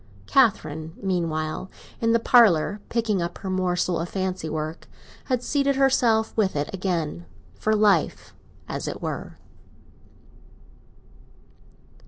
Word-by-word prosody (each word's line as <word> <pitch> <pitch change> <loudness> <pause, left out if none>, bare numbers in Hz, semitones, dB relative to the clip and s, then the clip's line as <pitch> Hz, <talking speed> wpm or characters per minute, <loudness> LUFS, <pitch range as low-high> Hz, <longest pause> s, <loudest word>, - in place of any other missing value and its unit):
Catherine, 160 - +1
meanwhile, 165 -2 -2 0.3
in 230 0 +2
the 230 - +5
parlour, 210 -5 +4
picking 220 -5 0
up 170 - -4
her 190 - -5
morsel 180 -1 0
of 170 +1 -3
fancy 185 -4 -3
work, 155 +1 -5 0.4
had 250 -2 -1
seated 280 0 +1
herself 245 -5 +2
with 200 -6 +1
it 145 +4 -2
again—for 150 - -3
life, 205 -6 +2 0.3
as - - -4
it - - -4
were. - - -5
185 Hz, 110 wpm, -24 LUFS, 160-220 Hz, 0.4 s, the